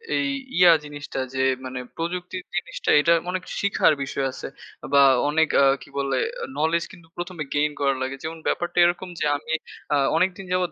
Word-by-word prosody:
এই 285 - +1 0.3
ইয়া 180 -1 +8
জিনিসটা 145 -2 -6
যে 130 - -3 0.3
মানে 130 0 -5 0.2
প্রযুক্তির 180 +2 -4
জিনিসটা 175 -1 -3
এটা 170 +3 +4 0.2
অনেক 185 0 -2 0.2
শিখার 200 -5 +3
বিষয় 135 0 -2
আছে - - -7 0.5
বা 140 - +7 0.3
অনেক 160 +2 +3 0.2
আ - - +6 0.2
কি - - -13
বলে 140 -1 0 0.3
আ - - -1
নলেজ 160 +2 +2
কিন্তু 170 -3 -15
১ম 175 +1 -5
এ - - -10
গেইন 150 +1 +2
করা 140 -1 +3
লাগে। 130 +1 -2
যেমন 160 +1 -5
ব্যাপারটা 175 0 -1
এরকম 175 +1 -1
যে - - 0
আমি 160 +2 -5 0.4
আ - - +4 0.2
অনেকদিন 185 +3 0
যাবৎ 180 -1 +1
165 Hz, 185 wpm, -24 LUFS, 145-180 Hz, 0.5 s, ইয়া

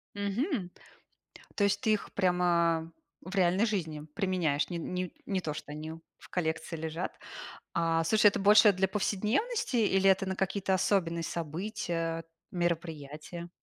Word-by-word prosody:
Мгм. 205 - -1 0.9
То 205 - +1
есть 200 +4 +2
ты 220 -3 +3
их 210 - -3
прямо 170 -3 +2 0.3
в 185 +3 -7
реальной 185 +3 +3
жизни 160 -8 -2
применяешь? 180 -8 0
Не 175 - -3
не 180 +1 -3
не 195 -2 0
то, 150 -3 -3
что 145 - -8
они 155 +1 -6 0.2
в - - -16
коллекции 160 -1 -2
лежат. 160 +2 -4 0.6
А 165 -1 +2
слушай, 215 +4 +4
это 200 - +5
больше 210 +1 +7
для 190 0 +1
повседневности 220 - 0
или 195 -3 +3
это 190 0 +4
на 190 - -1
какие-то 190 0 0
особенные 175 -3 +1
события, 165 0 -3 0.3
мероприятия? 170 -1 -3
180 Hz, 140 wpm, -30 LUFS, 165-200 Hz, 0.9 s, больше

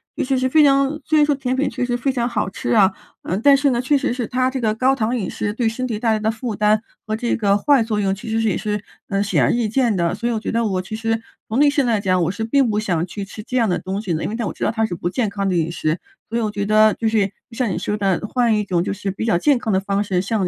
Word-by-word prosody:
尤 - - -1
其 265 +1 +1
是 260 0 +1
非 310 +2 +5
常 275 +1 +3
虽 310 - +2
然 - - +6
说 295 -1 +2
甜 260 -2 -2
品 280 +2 0
确 250 - -2
实 245 -1 -1
非 265 +3 0
常 240 -2 -1
好 235 - -1
吃 - - -5
啊， 200 -3 +5 0.3
呃， 185 - -2
但 280 +5 +6
是 280 +1 +2
呢， 240 -2 0
确 255 +4 +1
实 275 -3 0
是 245 -1 -2
它 255 +2 0
这 265 - -3
个 220 -3 +1
高 260 +4 +2
糖 235 -1 -1
饮 210 -7 -2
食， 205 - -3
对 225 0 0
身 255 +3 -4
体 225 -4 -3
带 225 -2 +2
来 215 - 0
的 215 +1 0
负 230 -1 -5
担 210 +1 +2 0.2
和 215 - -2
这 235 +2 -1
个 200 -3 +2
坏 275 +1 +4
作 215 -2 -2
用 195 -1 +1
其 205 - -10
实 225 0 0
是 225 - +2
也 - - 0
是， 210 -1 -3 0.3
呃， 195 0 0
显 200 - +1
而 - - +3
易 235 -2 0
见 235 -1 +1
的。 170 -1 0
所 235 +4 -3
以 240 - 0
我 220 - -1
觉 - - -4
得 230 0 +1
我 190 -3 0
其 190 +4 -7
实 225 0 -1 0.3
从 225 +4 -1
内 290 0 +6
心 285 -2 +1
来 225 -4 +1
讲， 185 -2 +2
我 165 - 0
是 200 +3 -4
并 265 +3 +2
不 210 - 0
想 175 -6 -1
去 200 +3 -6
吃 210 +2 -9
这 250 - -6
样 230 -4 +2
的 180 - +1
东 190 +2 -4
西 180 -6 -2
的， 155 - -3
因 - - -2
为 - - -3
但 230 -2 -2
我 - - -3
知 - - -6
道 - - +2
它 225 -1 -1
是 175 - -4
不 170 - -3
健 230 -3 0
康 200 0 -2
的 185 - 0
饮 165 -1 0
食。 160 0 -1 0.3
所 230 - -2
以 - - 0
我 215 -2 -1
觉 205 -1 -3
得， 215 +1 +4
就 225 - -1
是， 215 -2 +2 0.2
就 230 - -12
像 255 - +1
你 170 - -2
说 210 +3 -2
的， 195 -3 +1
呃， 210 - -4
换 235 -1 +2
一 210 - 0
种 180 -4 0
就 195 - -2
是 200 0 -4
比 195 +3 -4
较 225 - +2
健 285 +7 +3
康 225 -3 -2
的 190 - +3
方 200 +1 -1
式， 185 -3 0
像 200 -1 -1
220 Hz, 360 characters per minute, -20 LUFS, 200-245 Hz, 0.3 s, 然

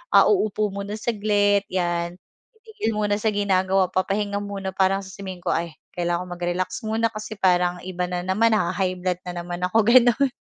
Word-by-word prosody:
ah - - +7
uupo 215 - +1
muna 200 +1 -5
saglit 205 -3 +2
'yan, 175 -1 -1 0.4
titigil 440 - -3
muna 210 -1 +1
sa 215 0 +1
ginagawa, 190 -2 +2
papahinga 200 +2 0
muna 195 -1 -4
parang 195 0 +2
sasabihin 190 -1 -8
ko, - - -9
"Ay 165 -1 -3 0.2
kailangan 175 +1 -1
ko - - -4
mag-relax 175 +1 -2
muna, 225 +1 +1
kasi 215 0 -7
parang 180 -1 +2
iba 180 -1 -3
na 180 0 -3
naman, 205 +5 +2
naha-high 185 -2 0
blood 180 -1 0
na 175 -1 -4
naman 175 0 -6
ako." 185 +5 +2
Gano'n. 245 +2 +5
195 Hz, 175 wpm, -23 LUFS, 180-210 Hz, 0.4 s, ah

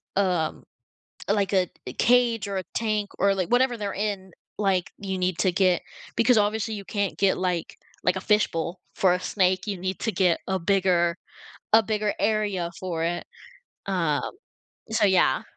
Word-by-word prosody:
um 180 -5 0 0.7
like, 200 -1 +1
a 185 -2 +2 0.2
a - - -5
cage 240 -3 +3
or 195 - -2
a 190 - -2
tank 215 -2 0
or, 200 +1 +4
like, 185 -3 -1
whatever 245 0 +3
they're 205 -3 -3
in, 200 -2 -3 0.3
like, 195 -3 0
you 190 -1 -3
need 180 -1 0
to 185 - +3
get, 185 -1 +3 0.4
because 230 +1 +4
obviously 215 +1 +1
you 200 - -7
can't 205 -2 -2
get 195 -1 +3
like 180 -3 -2 0.3
like, 180 - +2
a - - -4
fishbowl 185 -5 0 0.2
for 185 -2 +4
a 180 - 0
snake, 185 -1 +1
you 200 -2 -2
need 185 +1 -3
to 225 - -1
get 180 -3 +2
a 190 0 0
bigger 180 -2 +2 0.6
a 225 - +8
bigger 210 -1 -1
area 205 -4 0
for 170 -3 -2
it, 175 +1 -2 0.6
um, 170 -7 0 0.6
so 220 - +2
yeah. 185 -8 +3
190 Hz, 170 wpm, -25 LUFS, 180-210 Hz, 0.7 s, a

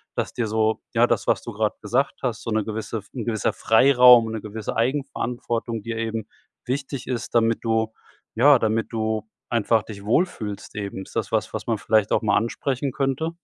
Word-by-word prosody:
Dass - - -2
dir 120 -2 -1
so 110 0 +1
ja, 120 0 +4
das, - - 0
was - - +2
du 120 - -7
gerade 105 0 0
gesagt 125 +7 0
hast, 120 -4 -2
so - - -4
'ne 110 0 +1
gewisse 110 +1 -4
F 100 - -17
'n 120 -5 -4
gewisser 110 -3 0
Freiraum 125 0 +6
und 110 - -5
'ne 110 - -4
gewisse 110 0 -5
Eigenverantwortung 120 -3 -2
dir 115 +2 -5
eben 115 -1 -3 0.4
wichtig 135 0 -4
ist, 125 -2 -4
damit 115 -1 +3
du 110 -1 0 0.4
ja, 135 +3 +6
damit 110 0 0
du 110 -1 -2 0.2
einfach 115 -1 +2
dich 100 -2 -10
wohlfühlst 110 - -1
eben. 100 -2 -5
Ist - - -16
das - - -2
was, - - -1
was - - -5
man 115 -2 +1
vielleicht 110 0 +2
auch - - +3
mal 105 - +2
ansprechen 130 +4 -1
könnte? 135 +4 -1
115 Hz, 195 wpm, -23 LUFS, 110-125 Hz, 0.4 s, Freiraum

